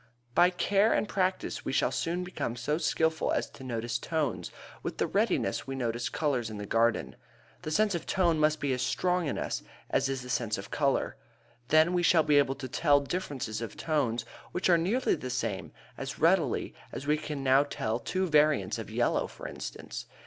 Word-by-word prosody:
By 175 +6 +6
care 200 +4 +2
and - - +1
practice 185 -2 -1
we - - -3
soon 170 +5 0
become 180 -9 -3
so 150 +6 -1
skilful 160 -1 +1
as - - 0
to 130 - -12
notice 120 -1 -2
tones 135 - -2 0.3
with - - -4
the - - +1
readiness - - 0
we 135 - -3
notice 120 -2 -2
colors 130 -7 0
in 110 - -6
the 105 - -5
garden. 115 +2 +1 0.5
The - - -5
sense 210 +6 +2
of 170 - -4
tone 170 -4 +2
must 155 0 +3
be 140 -2 0
as 125 - -2
strong 180 +5 +1
in - - -2
us - - -2 0.3
as 135 - +2
is 135 -2 -3
the 125 - -9
sense 115 -3 0
of 100 - -8
color. 140 -2 0 0.5
Then 155 +4 +5
we 175 - +2
shall 170 -2 +5
be 150 -1 +5
able 135 -1 +2
to 135 -2 -6
tell 145 +2 +3
differences 140 - -3
of 115 -3 -6
tones 125 -8 0 0.3
which 180 0 +2
are 170 - +6
nearly 220 +10 +1
the 130 - -4
same, 120 -6 -2 0.3
as 135 0 -5
readily 165 -5 +2 0.2
as 135 - -6
we 150 +1 +3
can 150 -2 -5
now 135 +1 +5
tell 115 -5 -2
two 185 +10 -1
varieties 150 - +3
of - - -6
yellow, - - +1
for - - -9
instance. - - -7
145 Hz, 195 wpm, -29 LUFS, 125-170 Hz, 0.5 s, By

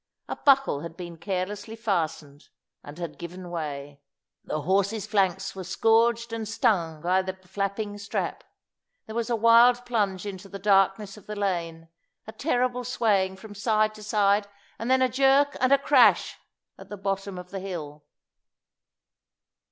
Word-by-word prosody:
A - - -4
buckle 275 - +3
had 165 0 -8
been 175 -2 -7
carelessly 195 +5 -4
fastened, 165 -9 -3 0.3
and 145 +2 -11
had 170 -3 -6
given 175 +1 -8
way. 145 -3 -5 0.4
The 155 - -3
horse's 200 +6 0
flanks 195 -3 0
were 190 - -6
scourged 225 +5 +2
and 225 -1 -4
stung 170 -7 0
by 185 +2 +3
the 190 0 -5
flapping 200 +2 -3
strap. 200 0 -3 0.6
There 220 - -9
was 230 0 -2
a 235 - +2
wild 235 +2 +5
plunge 205 -6 -1
into 195 -1 -7
the 200 - -7
darkness 195 +1 +2
of 210 - -16
the 210 - -5
lane, 170 -5 -3 0.4
a 220 - -8
terrible 250 -2 -1
swaying 210 -6 +1
from 205 +2 -11
side 215 +1 +1
to 215 - -12
side, 205 -1 +2 0.3
and 230 +3 -3
then 260 0 +4
a - - +4
jerk 270 +3 +3
and 255 +1 +3
a 280 - +7
crash 275 -2 +4 0.4
at - - -12
the 205 - -7
bottom 195 0 -3
of 180 0 -9
the 195 - -4
hill. 155 -6 -7
200 Hz, 160 wpm, -26 LUFS, 180-225 Hz, 0.6 s, a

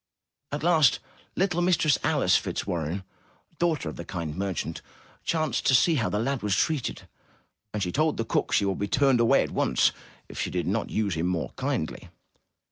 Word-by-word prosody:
At 145 +1 -3
last, 160 -6 +5 0.4
little 180 -2 +1
Mistress 165 -5 +3
Alice - - +3
Fitzwarren, 85 +3 -2 0.6
daughter 165 - 0
of 80 - -6
the 85 - -5
kind 85 -4 -5
merchant, 95 -4 -3 0.4
chanced 155 -7 0
to 130 - +5
see 165 +7 +4
how 120 -8 +1
the - - -1
lad 130 +4 -1
was 105 -2 +1
treated, 155 -6 -1 0.7
and 105 -2 -2
she 90 - -2
told 155 - +1
the 115 - -1
cook - - 0
she - - +3
should 95 -2 -1
be 100 - -1
turned 135 +1 +3
away 115 -1 +4
at - - -6
once - - +2 0.4
if - - -6
she - - -1
did 90 -1 -2
not 105 +4 -1
use 105 -3 0
him 80 +2 -1
more 90 -3 -2
kindly. - - -3
115 Hz, 185 wpm, -27 LUFS, 90-155 Hz, 0.7 s, last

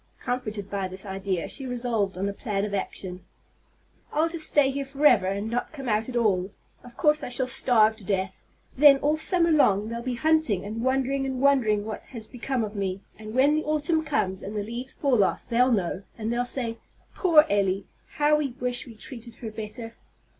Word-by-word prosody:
Comforted 220 -6 -4
by 200 -2 -2
this 185 +2 -6
idea, 190 -2 -3
she 275 - -4
resolved 235 -6 -1
on 195 +2 -1
a 200 - -2
plan 200 -2 -2
of 205 - -5
action. 185 -2 -4 0.9
"I'll 315 +2 +1
just 330 -2 -1
stay 280 -2 +3
here 280 +1 -3
forever, 275 -8 +3
and 200 +2 -2
not 240 +2 -2
come 275 -4 -7
out 220 +1 0
at 250 - -6
all. 195 -6 +1 0.3
Of 245 -1 -14
course, 300 0 +3
I - - -4
shall 250 +1 +2
starve 240 -4 +3
to 215 - -14
death. 190 0 -2 0.3
Then, 280 0 +7
all 295 +3 +1
summer 335 +1 +1
long 215 -9 +3
they'll 235 0 -4
be 250 0 -3
hunting, 310 - +2
and 220 +2 -5
wondering 270 +1 0
and 260 -1 -3
wondering 240 -7 +3
what 215 -1 -5
has 230 -4 -7
become 250 +1 -3
of 210 0 -5
me; 195 -1 -2 0.2
and 215 +1 -8
when 275 +3 +4
the 310 0 0
autumn 310 +2 +1
comes, 190 -10 -1
and 205 +2 -7
the 205 - -1
leaves 240 +5 -3
fall 255 -8 +2
off, - - -1
they'll 250 +2 +3
know, 190 -3 0 0.2
and 225 +1 -2
they'll 245 +1 0
say, 235 -3 -4 0.3
'Poor 320 -5 +5
Elly! 195 -1 +1 0.3
how 295 +1 +3
we 285 -4 -2
wish 245 0 -2
we'd 225 -3 -13
treated 235 -2 -10
her 225 -2 -7
better!'" 225 +2 -7
235 Hz, 205 wpm, -26 LUFS, 205-270 Hz, 0.9 s, Then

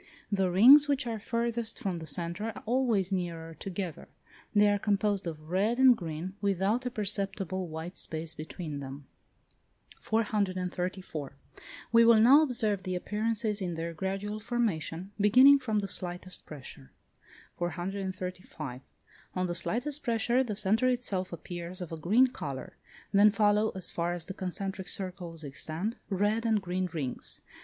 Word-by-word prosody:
The 195 -2 +2
rings 260 +11 +8
which 280 -3 +1
are 225 -2 -3
farthest 235 +1 -2
from 185 -4 -3
the 160 - -8
centre 170 +7 -3
are 225 -2 -6
always 225 -6 +1
nearer 170 -3 -3
together: 180 -2 -5 0.4
they 210 0 +5
are 205 0 +2
composed 200 -2 0
of 155 0 -7
red 205 +6 +2
and 260 -1 +7
green 170 -1 -5
without 200 +5 +1
a - - 0
perceptible 195 -4 -2
white 160 +3 -6
space 160 0 -4
between 155 -1 -6
them. 135 +1 -8 0.9
434. 185 -7 -2 0.6
We 230 0 +7
will 230 -1 +7
now 260 +7 +8
observe 235 -9 +1
the 185 -1 -3
appearances 210 +2 -1
in 175 -2 -2
their 165 +1 -4
gradual 195 +5 -3
formation, 200 -6 -2
beginning 255 +7 +7
from 225 -5 -1
the 200 - -3
slightest 180 0 -3
pressure. 130 - -11 0.7
435. 180 -6 -4 0.5
On 185 0 0
the 175 - -2
slightest 250 - 0
pressure 235 +1 +2
the 215 -5 -4
centre 215 +5 +2
itself 205 -7 -1
appears 175 +1 -6
of 180 -3 -6
a - - -3
green 205 +11 +4
colour. 140 - -6 0.4
Then 205 +1 +7
follow 210 +1 +3
as 190 - -3
far 170 +1 -1
as 175 -2 -4
the 190 - -6
concentric 190 0 -4
circles 175 -4 -4
extend, 160 - -4
red 205 +3 +1
and 225 -2 +2
green 185 -1 -2
rings. 140 -6 -4
195 Hz, 150 wpm, -30 LUFS, 175-220 Hz, 0.9 s, rings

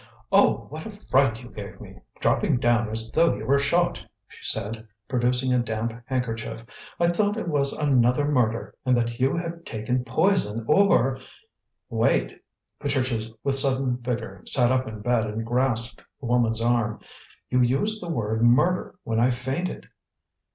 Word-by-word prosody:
"Oh, - - +4
what 155 +5 -7
a - - -6
fright 135 - +1
you 120 - -11
gave 100 -4 -9
me, - - -12 0.2
dropping - - +2
down 120 -2 +2
as 110 +1 -2
though 165 -4 +3
you 105 +2 -7
were 140 +3 +3
shot," 175 +5 +1 0.3
she - - -15
said, 110 +2 -1 0.2
producing 125 +1 +1
a 125 - +3
damp 115 -1 -2
handkerchief. 115 -3 -3 0.3
"I 170 0 +3
thought 205 +4 +1
it 225 - -4
was 140 -4 +1
another 135 -1 +2
murder, 120 -6 0
and 125 -2 +2
that 120 0 -2
you 130 +1 +2
had 170 0 -5
taken 125 +1 -2
poison, 125 - +1
or 150 -8 +3 0.3
" - - -57
"Wait!" - - +1 0.4
Patricia 130 -6 -1
with 140 - +1
sudden 135 -2 +3
vigour 120 -6 -5
sat 125 -2 +3
up 130 -1 +1
in 110 -1 -7
bed 120 0 +1
and 110 +1 -4
grasped 120 -1 -1 0.2
the 140 - -9
woman's 115 -2 +1
arm. 120 -2 +1 0.5
"You 125 0 +3
used 140 - 0
the 175 - -6
word 110 -6 -1
murder 125 +10 +3
when 115 0 -1
I 120 +2 +4
fainted." 130 +8 -3
125 Hz, 165 wpm, -25 LUFS, 115-140 Hz, 0.5 s, Oh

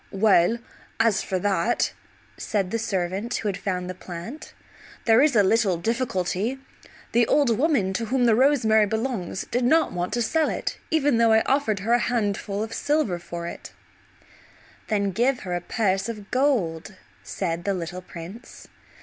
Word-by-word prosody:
"Well, 200 +1 +4 0.4
as 225 -3 +3
for 190 - -2
that," 200 +4 0 0.4
said 195 -4 -2
the 230 - -1
servant 195 +2 -2
who 215 - -2
had 200 - -1
found 180 -1 -3
the 185 - -4
plant, 185 - -9 0.5
"there 225 +1 +5
is 290 -3 +3
a 210 - +6
little 195 -2 +2
difficulty. 220 +2 -1 0.5
The 235 0 +3
old 275 -6 +3
woman 250 - +1
to 230 +4 -2
whom 250 +2 +1
the 230 - +5
rosemary 220 -4 +4
belongs 220 -4 -3
did 245 +1 0
not 320 +7 +3
want 180 0 -3
to 240 0 +1
sell 315 +6 +1
it - - -3
even 290 -6 +2
though 230 -1 +5
I 220 - +5
offered 260 -8 +1
her 225 +4 +1
a 240 - +5
handful 205 -4 -1
of 225 0 -6
silver 290 - 0
for 170 0 -7
it." 170 - -8 1.1
"Then 200 -2 0
give 245 +7 +1
her 180 -2 -3
a 175 - -2
purse 195 +1 0
of 210 -3 -8
gold," 210 - 0 0.3
said 170 -3 -3
the 200 0 0
little 180 +1 -5
prince. 185 +6 -11
215 Hz, 165 wpm, -24 LUFS, 185-240 Hz, 1.1 s, a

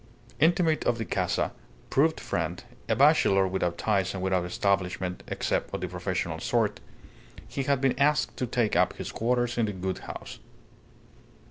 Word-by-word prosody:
Intimate 165 0 +3
of 120 - +2
the 115 - -3
casa, 90 -3 0 0.4
proved 160 +4 +3
friend, 85 +1 -3 0.3
a - - +3
bachelor 95 -1 +5
without 90 -2 -1
ties 100 -2 0
and 95 - -4
without 95 -2 +1
establishment 90 0 -1
(except - - -1
of - - -5
the 90 - -2
professional 90 0 -3
sort), - - 0 0.7
he 140 - -3
had 140 0 +1
been 135 -1 +1
asked 150 +2 +2
to 125 - -1
take 115 -5 0
up 90 +1 +3
his - - -6
quarters 120 +1 0
in 115 - +2
the 105 - -3
Gould 95 0 -3
house. - - -8
100 Hz, 160 wpm, -27 LUFS, 90-125 Hz, 0.7 s, bachelor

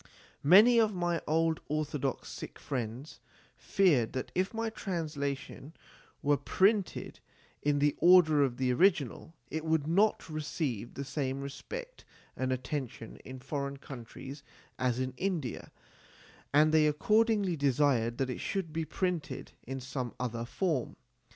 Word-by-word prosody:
Many 210 - +7
of 220 -2 +4
my 175 -1 0
old 160 +1 +2
orthodox 145 -3 -2
Sikh - - -8
friends 125 +2 -5 0.4
feared 150 - +2
that 130 - -4
if 185 +1 0
my 225 0 -2
translation 155 -7 -4 0.5
were 145 0 +3
printed 195 - +1 0.4
in 145 0 +2
the 145 0 +3
order 170 -4 +6
of 130 -3 +1
the 130 -1 +1
original, 165 - +1 0.2
it 160 0 -3
would 160 -2 +1
not 195 +7 +2
receive 150 - -3
the 140 - -4
same 135 0 -2
respect 470 - -7 0.3
and 130 0 -1
attention 130 -3 -4
in 130 0 -10
foreign 140 +1 -4
countries 135 +1 -9 0.4
as 125 -1 +1
in 130 0 -2
India, 175 -10 -3 0.8
and 155 +2 +5
they 155 -1 +5
accordingly 210 +4 +2
desired 135 -5 +2
that 130 -1 -1
it - - -5
should 185 -6 -3
be 165 0 -1
published 170 -7 -3
in 135 +1 -4
some 130 -1 -5
other 120 -2 -3
form. 155 -1 -1
145 Hz, 135 wpm, -31 LUFS, 130-175 Hz, 0.8 s, Many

